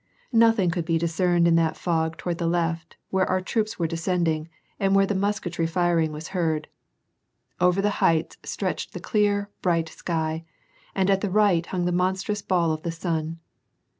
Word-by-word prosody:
Nothing 225 Hz, -6 st, +4 dB
could 170 Hz, -1 st, -2 dB
be 165 Hz, -1 st, +1 dB
discerned 170 Hz, +1 st, +2 dB
in 170 Hz, -, +4 dB
that 165 Hz, -1 st, +1 dB
fog 160 Hz, -2 st, -1 dB
toward 175 Hz, -2 st, -3 dB
the 170 Hz, -, 0 dB
left, 165 Hz, -1 st, -1 dB
where 190 Hz, -1 st, +1 dB
our 185 Hz, -, +2 dB
troops 215 Hz, +3 st, -2 dB
were 170 Hz, -, 0 dB
descending, 165 Hz, -1 st, -1 dB, 0.3 s
and 195 Hz, -1 st, +2 dB
where 195 Hz, 0 st, +5 dB
the 205 Hz, -, -1 dB
musketry 190 Hz, -4 st, -1 dB
firing 165 Hz, -2 st, +1 dB
was 155 Hz, +1 st, -7 dB
heard. 160 Hz, -5 st, -1 dB, 0.9 s
Over 180 Hz, +2 st, +3 dB
the 205 Hz, -, +2 dB
heights 165 Hz, 0 st, +2 dB
stretched -, -, -3 dB
the -, -, -5 dB
clear, 205 Hz, -2 st, 0 dB
bright 165 Hz, -3 st, +1 dB
sky, 160 Hz, -1 st, -3 dB, 0.5 s
and 190 Hz, -1 st, +2 dB
at 195 Hz, 0 st, +2 dB
the 205 Hz, -, -1 dB
right 185 Hz, -4 st, +3 dB
hung 180 Hz, -2 st, -2 dB
the 180 Hz, -, +1 dB
monstrous 190 Hz, +3 st, 0 dB
ball 170 Hz, -4 st, +1 dB
of 155 Hz, 0 st, -3 dB
the 170 Hz, -, -3 dB
sun. 165 Hz, -1 st, -3 dB
175 Hz, 175 wpm, -25 LUFS, 165-190 Hz, 0.9 s, where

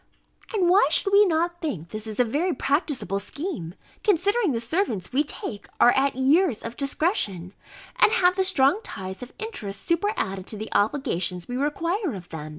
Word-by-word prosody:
And 395 Hz, -6 st, +1 dB
why 365 Hz, -3 st, +5 dB
should 390 Hz, +5 st, +2 dB
we 410 Hz, 0 st, +7 dB
not 345 Hz, +1 st, 0 dB
think 180 Hz, -, -4 dB
this 215 Hz, +2 st, -4 dB
a -, -, +6 dB
very 300 Hz, +9 st, -1 dB
practicable 265 Hz, -, -1 dB
scheme, 230 Hz, -, -5 dB, 0.3 s
considering 405 Hz, +1 st, +2 dB
the 235 Hz, -, -1 dB
servants 230 Hz, -, -2 dB
we 285 Hz, +3 st, +3 dB
take 215 Hz, -7 st, -6 dB
are 240 Hz, -, +7 dB
at 270 Hz, +1 st, +1 dB
years 275 Hz, -, +2 dB
of 230 Hz, +1 st, -6 dB
discretion, 255 Hz, -, -1 dB, 0.4 s
and -, -, +5 dB
have 365 Hz, -5 st, +4 dB
the 380 Hz, -, +2 dB
strong 370 Hz, 0 st, +3 dB
ties 190 Hz, -, -7 dB
of 250 Hz, -, -8 dB
interest 215 Hz, -, -6 dB
superadded 335 Hz, -, -1 dB
to 215 Hz, -, -5 dB
the 215 Hz, +1 st, -6 dB
obligations 195 Hz, -, 0 dB
we 245 Hz, -, -4 dB
require 330 Hz, -, -1 dB
of 180 Hz, -2 st, -10 dB
them? 155 Hz, -2 st, -7 dB
275 Hz, 170 wpm, -25 LUFS, -, 0.4 s, we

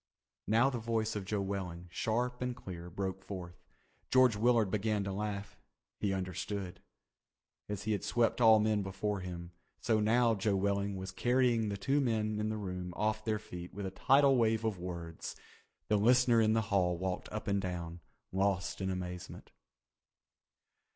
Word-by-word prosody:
Now 115 Hz, +5 st, +4 dB
the 125 Hz, -, -3 dB
voice 110 Hz, -1 st, -1 dB
of 100 Hz, -2 st, -3 dB
Joe 105 Hz, 0 st, -1 dB
Welling, 90 Hz, -3 st, -4 dB
sharp 125 Hz, +7 st, -1 dB
and 125 Hz, -1 st, -1 dB
clear, 90 Hz, -4 st, -8 dB
broke 95 Hz, +1 st, -4 dB
forth. 90 Hz, -3 st, -8 dB, 0.5 s
George 130 Hz, -3 st, +5 dB
Willard 115 Hz, -2 st, +3 dB
began 105 Hz, 0 st, 0 dB
to 100 Hz, -, -3 dB
laugh. 100 Hz, 0 st, -4 dB, 0.4 s
He 100 Hz, -, 0 dB
understood. 95 Hz, 0 st, -4 dB, 0.9 s
As 105 Hz, -1 st, -3 dB
he 110 Hz, -, -1 dB
had 100 Hz, -3 st, -1 dB
swept 120 Hz, +1 st, +1 dB
all 110 Hz, -1 st, +8 dB
men 105 Hz, -1 st, +2 dB
before 95 Hz, +1 st, -2 dB
him, 85 Hz, -2 st, -7 dB, 0.3 s
so 110 Hz, -2 st, +2 dB
now 115 Hz, +2 st, +4 dB
Joe 100 Hz, -1 st, +1 dB
Welling 100 Hz, +1 st, 0 dB
was 95 Hz, 0 st, -5 dB
carrying 120 Hz, +1 st, +2 dB
the 100 Hz, -, -3 dB
two 135 Hz, +9 st, +1 dB
men 110 Hz, -4 st, 0 dB
in 105 Hz, 0 st, 0 dB
the 110 Hz, -, -2 dB
room 90 Hz, -3 st, -5 dB
off 110 Hz, 0 st, 0 dB
their 110 Hz, -1 st, 0 dB
feet 90 Hz, -4 st, -9 dB
with 100 Hz, -1 st, -4 dB
a 95 Hz, -, -3 dB
tidal 135 Hz, +5 st, +4 dB
wave 115 Hz, -1 st, +2 dB
of 105 Hz, -5 st, -1 dB
words. 85 Hz, -2 st, -6 dB, 0.5 s
The 105 Hz, -, +3 dB
listener 120 Hz, +2 st, +5 dB
in 110 Hz, 0 st, +3 dB
the 115 Hz, -, +3 dB
hall 90 Hz, -3 st, +3 dB
walked 95 Hz, +1 st, -3 dB
up 110 Hz, -, -5 dB
and 100 Hz, -1 st, +1 dB
down, 85 Hz, -2 st, -4 dB, 0.3 s
lost 100 Hz, +1 st, 0 dB
in 95 Hz, -, -1 dB
amazement. 90 Hz, -1 st, -6 dB
100 Hz, 170 wpm, -33 LUFS, 95-110 Hz, 0.9 s, all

